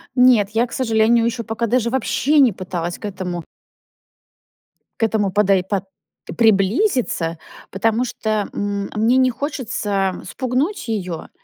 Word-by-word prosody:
Нет, 250 -5 +5
я 230 +3 +1
к - - -21
сожалению 230 -1 +2
еще 235 0 -2
пока 225 +2 -2
даже 235 0 +1
вообще 265 +4 +1
не 260 -4 +6
пыталась 175 -2 -4
к - - -9
этому 180 -4 -4 1.6
к - - +1
этому 210 -3 +1
подой 195 -2 +3
под 195 +1 -2 0.5
приблизиться, 220 - +2 0.3
потому 225 +5 +1
что, 235 -2 -4 0.2
м, 200 -1 -3
мне 230 +4 +3
не 260 -1 +4
хочется 215 - -2
спугнуть 260 - -2
ее, 180 -7 -4
220 Hz, 130 wpm, -20 LUFS, 195-250 Hz, 1.6 s, не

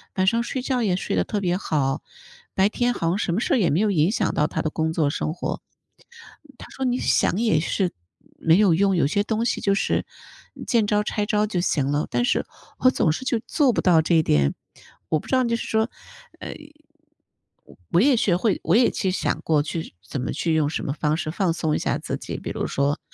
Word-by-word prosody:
晚 190 0 +1
上 230 +4 +3
睡 255 +2 -3
觉 255 -1 -1
也 190 -4 +1
睡 185 - -2
得 - - +2
特 210 - -3
别 180 -1 0
好。” 135 -8 -1 0.5
白 190 +1 +3
天 245 +2 0
好 165 - -2
像 175 +3 +1
什 190 - -1
么 195 - +1
事 - - 0
儿 - - +3
也 185 -8 +2
没 155 - +2
有 215 0 +2
影 165 0 +2
响 - - 0
到 150 - +2
他 - - -3
的 155 - -1
工 160 +1 -1
作 155 -4 +1
生 155 +1 -2
活。 175 - -4 1.0
他 - - -11
说： 265 - -4
“你 250 0 +1
想 190 - +2
也 220 -9 +3
是 180 +3 -1 0.5
没 165 +1 +4
有 200 -5 +5
用， 195 +3 +2
有 170 - +2
些 200 +7 +1
东 220 +2 -1
西 235 - -1
就 200 - +2
是 - - 0 0.5
嗯， - - -9
见 230 -4 +2
招 210 0 +2
拆 210 0 -2
招 210 0 +1
就 190 -4 -2
行 145 -5 0
了。” 145 +1 0
但 - - +1
是， - - +1 0.3
我 255 - +5
总 165 - +2
是 210 +12 -4
就 240 -3 +1
做 280 -6 +2
不 - - 0
到 170 -4 +5
这 165 +2 +1
一 160 - +4
点。 70 - +2 0.6
我 155 - +2
不 - - -13
知 260 - +1
道 255 - +3
就 235 0 +1
是 - - -5
说 220 +1 +1 0.5
呃， - - -7
嗯， 305 +1 -19 0.2
我 175 - +4
也 270 +2 +5
学 200 -6 +2
会 200 +1 0
我 - - +2
也 240 +1 +5
其 190 - -1
实 185 - -2
想 - - -1
过 155 -2 +2
去 160 - -5
怎 130 - -5
么 125 - -3
去 165 -2 0
用 150 -2 +2
什 160 - -3
么 140 - -2
方 150 0 0
式 155 - -3
放 175 0 0
松 160 -2 -1
一 - - 0
下 - - -1
自 - - -4
己， - - -6
比 - - -6
如 - - -3
说， 140 +2 0
190 Hz, 265 characters per minute, -23 LUFS, 160-230 Hz, 1.0 s, 有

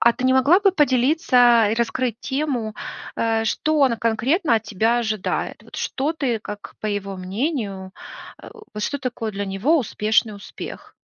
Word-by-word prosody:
А 235 - +5
ты 255 - -5
не 260 0 +4
могла 285 +9 +5
бы 395 -2 +4
поделиться 250 - +4
и - - +1
раскрыть 235 0 -1
тему, 265 -6 -2 0.4
э, 225 -1 +1
что 310 +7 0
он 260 -4 +4
конкретно 235 - +1
от 220 - -2
тебя 225 +3 +1
ожидает? 220 -4 -2
Вот - - -18
что 285 +4 -1
ты, 260 -8 -1
как 210 -1 -9
по - - -3
его 200 -2 -3
мнению, 195 - -3 0.5
э - - -10 0.2
вот 210 - -4
что 285 +6 -2
такое 235 -4 -4
для 200 0 -4
него 215 +13 +2
успешный 215 -2 +1
успех? 200 - -10
235 Hz, 170 wpm, -22 LUFS, 215-270 Hz, 0.5 s, А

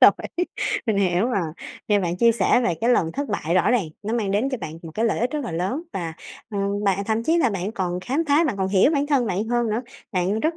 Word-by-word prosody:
Rồi, - - +10 0.8
mình 220 -3 +1
hiểu 185 +1 +2
rồi, 195 -8 0 0.4
nghe 205 -1 +4
bạn 175 -2 -1
chia 230 +4 +5
sẻ 235 - +3
về 175 - +1
cái 235 +2 +2
lần 165 -9 +2
thất 285 0 -3
bại 170 -5 -1
rõ 185 - +3
ràng 230 -10 +1
nó 215 +3 -2
mang 215 -5 0
đến 210 +7 +1
cho 260 - -2
bạn 160 -5 -7
một 165 - -8
cái 225 - 0
lợi 230 - +1
ích 240 +2 +1
rất 295 -1 -3
là 235 - -4
lớn 185 - -2
và, 170 -3 -3 0.4
ờ, 205 - -3 0.3
bạn 200 0 +1
thậm 220 +2 0
chí 325 +8 +2
là 260 -8 +3
bạn 195 +1 -3
còn 180 -3 -2
khám 265 - 0
phá, 295 +4 +4
bạn 260 -10 -1
còn 190 -1 0
hiểu 195 +7 +4
bản 290 -2 +1
thân 275 -5 +2
bạn 200 +1 -1
hơn 240 -1 +1
nữa, 220 +3 -1 0.3
bạn 190 +3 0
rất 320 +4 0
215 Hz, 265 wpm, -23 LUFS, 185-245 Hz, 0.8 s, Rồi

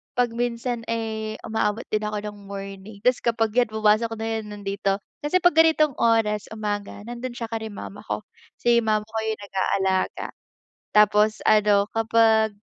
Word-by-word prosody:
kapag 245 -1 +2
minsan 240 0 -2
eh, 220 -1 -3
umaabot 220 0 -1
din 215 0 -1
ako 210 0 -2
ng 210 0 -7
morning, 195 +1 -8
tapos 250 +4 +2
kapag 225 -1 +1
iyan 245 -2 +3
pumasok 215 +1 +2
na 225 - -3
'yun 225 -1 -2
nandito, 200 -1 -2 0.2
kasi 365 +5 +2
kapag 350 -2 +4
ganitong 310 -4 +3
oras 220 -2 +2
umaga 205 -2 -4
nandun 240 +1 -5
siya 230 - -4
kila 220 -1 -4
mama 205 0 -9
ko, 215 -1 -4 0.3
si 235 -1 +3
mama 215 -1 0
ko 220 0 -6
'yung 220 -1 -2
nag-aalaga. 190 -1 -1 0.5
Tapos 210 0 +4
ano 210 -2 +4
kapag, 225 -1 +3
220 Hz, 155 wpm, -24 LUFS, 210-230 Hz, 0.5 s, kapag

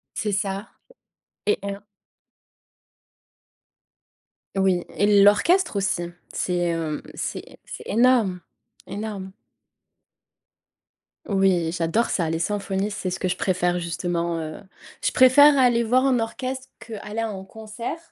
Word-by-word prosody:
C'est 210 - -1
ça 195 +1 -2 0.8
et 425 - +2
un 200 0 -5 2.8
Oui 190 -2 +2
et 205 0 +4
l'orchestre 315 - +4
aussi. 185 -3 -1 0.2
C'est, 180 -1 -1
hem, 165 -3 -1
c'est - - -6
c'est - - -9
énorme, 230 -5 +3 0.5
énorme. 205 -2 -5 1.9
Oui 190 -5 +2
j'adore 175 +7 0
ça, 170 -4 0
les 165 0 -1
symphonies 200 +2 -1
c'est 200 -3 -3
ce 185 +1 -4
que 185 - -1
je 180 - 0
préfère 180 -2 0
justement, 170 0 -2
heu. 155 -1 -6 0.4
Je - - +2
préfère 280 +3 +7
aller 240 -3 +4
voir 250 +3 +3
un 260 -3 +3
orchestre 260 +3 -4
qu'aller 215 -1 -7
à 225 - 0
un 195 -3 -6
concert 220 +7 -7
200 Hz, 120 wpm, -24 LUFS, 180-230 Hz, 2.8 s, préfère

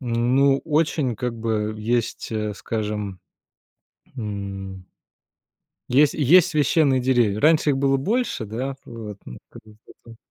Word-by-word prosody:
Ну, 130 +3 +2
очень 150 -5 0
как 125 0 -3
бы, 110 -1 -2
есть, 115 +2 -2
э, 105 -2 -3
скажем, 105 -2 -4 1.0
м 100 -4 -6 1.1
Есть 140 +3 +4
есть 160 +5 +5
священные 145 -2 +2
деревья. 120 -5 +1
Раньше 155 +1 +4
их 135 - 0
было 135 0 +2
больше, 220 - -1
да, 125 +6 -4
вот, 110 -4 -9
ну, - - -10
как - - -14
бы 105 -1 -17
потом 115 -1 -16
120 Hz, 130 wpm, -23 LUFS, 105-135 Hz, 1.1 s, есть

